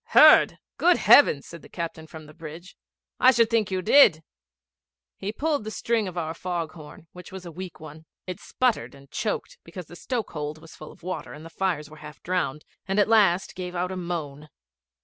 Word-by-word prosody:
'Heard! -, -, +6 dB, 0.2 s
Good 350 Hz, 0 st, +5 dB
heavens!' 145 Hz, -, +6 dB
said 170 Hz, -1 st, -11 dB
the -, -, -15 dB
captain 165 Hz, -2 st, -6 dB
from 155 Hz, 0 st, -11 dB
the 155 Hz, -, -14 dB
bridge, 165 Hz, +3 st, -11 dB, 0.4 s
'I 255 Hz, -, +7 dB
should 230 Hz, -1 st, +3 dB
think 220 Hz, -4 st, +1 dB
you 185 Hz, -1 st, -2 dB
did.' 170 Hz, -, +6 dB, 0.9 s
He 200 Hz, -, -5 dB
pulled 290 Hz, +2 st, -1 dB
the 215 Hz, -, -5 dB
string 225 Hz, -1 st, -1 dB
of 180 Hz, -1 st, -7 dB
our 160 Hz, -2 st, -2 dB
fog 170 Hz, -2 st, -4 dB
horn, 155 Hz, -1 st, -13 dB
which 180 Hz, +2 st, -12 dB
was 190 Hz, -1 st, -9 dB
a 170 Hz, -, -8 dB
weak 180 Hz, +2 st, -9 dB
one. 155 Hz, 0 st, -12 dB, 0.2 s
It 185 Hz, -2 st, -6 dB
sputtered 250 Hz, -, -1 dB
and 140 Hz, 0 st, -18 dB
choked, 215 Hz, +4 st, -3 dB
because 175 Hz, +1 st, -9 dB
the 175 Hz, -, -13 dB
stoke 235 Hz, +3 st, -4 dB
hold 150 Hz, 0 st, -5 dB
was 160 Hz, 0 st, -14 dB
full 155 Hz, -, -11 dB
of -, -, -20 dB
water 180 Hz, -4 st, -5 dB
and 155 Hz, +2 st, -11 dB
the 165 Hz, -, -11 dB
fires 175 Hz, -5 st, -2 dB
were 155 Hz, +1 st, -14 dB
half 150 Hz, -2 st, -11 dB
drowned, 175 Hz, -5 st, -2 dB, 0.2 s
and 195 Hz, +2 st, 0 dB
at 205 Hz, -, +3 dB
last 195 Hz, -5 st, +3 dB
gave 180 Hz, -1 st, -6 dB
out 180 Hz, +1 st, -2 dB
a -, -, -4 dB
moan. 155 Hz, -5 st, -5 dB
175 Hz, 210 wpm, -25 LUFS, 155-195 Hz, 0.9 s, I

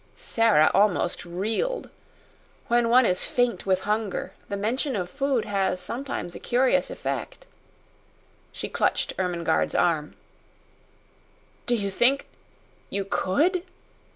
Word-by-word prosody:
Sara 225 Hz, -9 st, +3 dB
almost 195 Hz, -3 st, +2 dB
reeled. 220 Hz, -, -2 dB, 0.8 s
When 235 Hz, 0 st, +3 dB
one 250 Hz, +1 st, +6 dB
is 180 Hz, -2 st, +1 dB
faint 245 Hz, -4 st, 0 dB
with 185 Hz, -1 st, +2 dB
hunger 210 Hz, -1 st, -2 dB, 0.2 s
the 200 Hz, -, -2 dB
mention 250 Hz, +6 st, -1 dB
of 180 Hz, -3 st, -3 dB
food 275 Hz, -4 st, 0 dB
has 195 Hz, -2 st, 0 dB
sometimes 235 Hz, -2 st, -4 dB
a -, -, -8 dB
curious 255 Hz, +2 st, +2 dB
effect. -, -, -5 dB, 1.1 s
She -, -, -5 dB
clutched -, -, 0 dB
Ermengarde's 170 Hz, -, 0 dB
arm. 155 Hz, -3 st, +1 dB, 1.5 s
"Do 240 Hz, -, +3 dB
you 200 Hz, -3 st, -2 dB
think 250 Hz, +7 st, +2 dB, 0.6 s
you 200 Hz, -1 st, -2 dB
COULD?" 300 Hz, -, +1 dB
210 Hz, 115 wpm, -25 LUFS, 185-250 Hz, 1.5 s, one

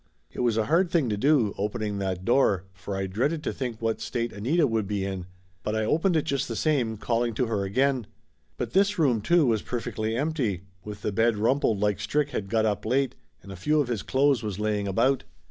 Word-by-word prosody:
It -, -, -9 dB
was 120 Hz, -3 st, +2 dB
a 110 Hz, -, +2 dB
hard 170 Hz, -, +3 dB
thing 160 Hz, -8 st, +1 dB
to 105 Hz, -, 0 dB
do, 120 Hz, -2 st, +3 dB
opening 105 Hz, 0 st, -2 dB
that 95 Hz, -1 st, -3 dB
door, 115 Hz, -7 st, +3 dB
for 95 Hz, +2 st, -6 dB
I 95 Hz, -, -1 dB
dreaded 135 Hz, -, -1 dB
to -, -, -2 dB
think 120 Hz, -4 st, -4 dB
what 115 Hz, -1 st, -1 dB
state 120 Hz, -1 st, -2 dB
Anita 145 Hz, +11 st, +2 dB
would 110 Hz, -5 st, 0 dB
be 100 Hz, -1 st, -1 dB
in, 95 Hz, -2 st, -4 dB, 0.3 s
but 105 Hz, -, -2 dB
I 110 Hz, 0 st, 0 dB
opened 165 Hz, -, +2 dB
it 155 Hz, -, +2 dB
just 140 Hz, -1 st, -1 dB
the -, -, -4 dB
same, 125 Hz, -8 st, +1 dB
calling 115 Hz, +1 st, 0 dB
to 125 Hz, -, +1 dB
her 110 Hz, -4 st, -1 dB
again. 130 Hz, +3 st, +1 dB, 0.5 s
But -, -, -4 dB
this 200 Hz, +2 st, +3 dB
room, 130 Hz, -9 st, +2 dB
too, 170 Hz, +6 st, +4 dB
was 110 Hz, -4 st, +2 dB
perfectly 115 Hz, -2 st, -3 dB
empty, 130 Hz, -, -1 dB, 0.2 s
with 105 Hz, -1 st, -8 dB
the -, -, 0 dB
bed 115 Hz, +2 st, +2 dB
rumpled 115 Hz, -1 st, +2 dB
like 105 Hz, -1 st, +1 dB
Strick 145 Hz, +8 st, 0 dB
had 100 Hz, -7 st, -3 dB
got 110 Hz, 0 st, +2 dB
up 105 Hz, -2 st, 0 dB
late 130 Hz, +4 st, +1 dB, 0.3 s
and 100 Hz, -, -10 dB
a -, -, -7 dB
few 150 Hz, -, +1 dB
of 140 Hz, -4 st, 0 dB
his 115 Hz, -5 st, -1 dB
clothes 135 Hz, -2 st, +2 dB
was 105 Hz, -4 st, -4 dB
laying 105 Hz, -1 st, -1 dB
about. 130 Hz, +8 st, +2 dB
115 Hz, 225 wpm, -26 LUFS, 105-135 Hz, 0.5 s, too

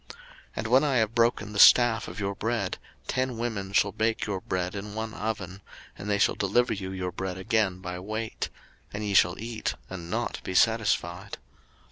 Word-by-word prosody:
03:026:026 -, -, -33 dB, 0.5 s
And 110 Hz, -, -3 dB
when 130 Hz, +5 st, +5 dB
I 140 Hz, -3 st, +1 dB
have 110 Hz, -2 st, +2 dB
broken 115 Hz, -3 st, +1 dB
the 100 Hz, -, -2 dB
staff 120 Hz, -2 st, +7 dB
of -, -, -7 dB
your 100 Hz, -1 st, -1 dB
bread, 110 Hz, -2 st, -2 dB, 0.3 s
ten 130 Hz, -2 st, -1 dB
women 110 Hz, -5 st, -3 dB
shall 100 Hz, 0 st, +3 dB
bake 110 Hz, +3 st, 0 dB
your 100 Hz, -3 st, -3 dB
bread 90 Hz, 0 st, -2 dB
in 105 Hz, +1 st, -6 dB
one 110 Hz, 0 st, -4 dB
oven, 100 Hz, -4 st, -4 dB, 0.3 s
and 105 Hz, -, -7 dB
they 100 Hz, -, +2 dB
shall -, -, +3 dB
deliver 110 Hz, +4 st, +1 dB
you 95 Hz, -3 st, -5 dB
your 90 Hz, -1 st, -3 dB
bread 95 Hz, 0 st, -4 dB
again 95 Hz, -2 st, 0 dB
by 90 Hz, -1 st, -5 dB
weight: 110 Hz, +4 st, -4 dB, 0.4 s
and 105 Hz, +1 st, -4 dB
ye 100 Hz, -, -1 dB
shall 90 Hz, -2 st, +4 dB
eat, 115 Hz, 0 st, -3 dB, 0.2 s
and 85 Hz, -3 st, -7 dB
not -, -, -2 dB
be 95 Hz, -, -4 dB
satisfied. 100 Hz, -4 st, +1 dB
105 Hz, 190 wpm, -27 LUFS, 95-115 Hz, 0.5 s, staff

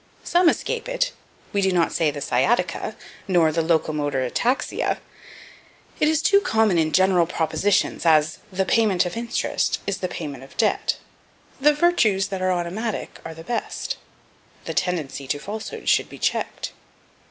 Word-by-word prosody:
Some 350 Hz, -1 st, +4 dB
escape 485 Hz, +6 st, -2 dB
it: -, -, 0 dB, 0.4 s
we 200 Hz, -, +2 dB
do 190 Hz, -1 st, +2 dB
not 175 Hz, -2 st, +2 dB
say, 160 Hz, -2 st, +2 dB
"the 145 Hz, -1 st, -5 dB
sciatica," -, -, 0 dB, 0.3 s
nor 170 Hz, -4 st, +4 dB
"the 165 Hz, +2 st, +1 dB
locomotor 150 Hz, -4 st, 0 dB
ataxia." 245 Hz, -, 0 dB, 1.0 s
It 300 Hz, -, +3 dB
is 315 Hz, 0 st, +2 dB
too 400 Hz, +5 st, +5 dB
common 220 Hz, -, +2 dB
in 155 Hz, -1 st, +1 dB
general 185 Hz, -1 st, +4 dB
propositions, 180 Hz, +4 st, 0 dB
as, 155 Hz, -2 st, +3 dB
"The 190 Hz, +1 st, 0 dB
payment 205 Hz, -6 st, +3 dB
of 175 Hz, -, -4 dB
interest 235 Hz, +1 st, -1 dB
is 200 Hz, -1 st, -2 dB
the 185 Hz, -, -1 dB
payment 145 Hz, -7 st, -6 dB
of 135 Hz, -, -15 dB
debt." -, -, +1 dB, 0.6 s
"The 295 Hz, +2 st, +4 dB
virtues 235 Hz, -, +3 dB
that 190 Hz, -1 st, -4 dB
are 185 Hz, 0 st, +2 dB
automatic 185 Hz, +5 st, -3 dB
are 160 Hz, -, -7 dB
the 165 Hz, -, -10 dB
best." 240 Hz, +7 st, -3 dB, 0.7 s
"The -, -, -3 dB
tendency 150 Hz, -6 st, -2 dB
to 145 Hz, -, 0 dB
falsehood 210 Hz, +8 st, -7 dB
should -, -, +3 dB
be -, -, -10 dB
checked." -, -, -2 dB
185 Hz, 155 wpm, -23 LUFS, 160-225 Hz, 1.0 s, too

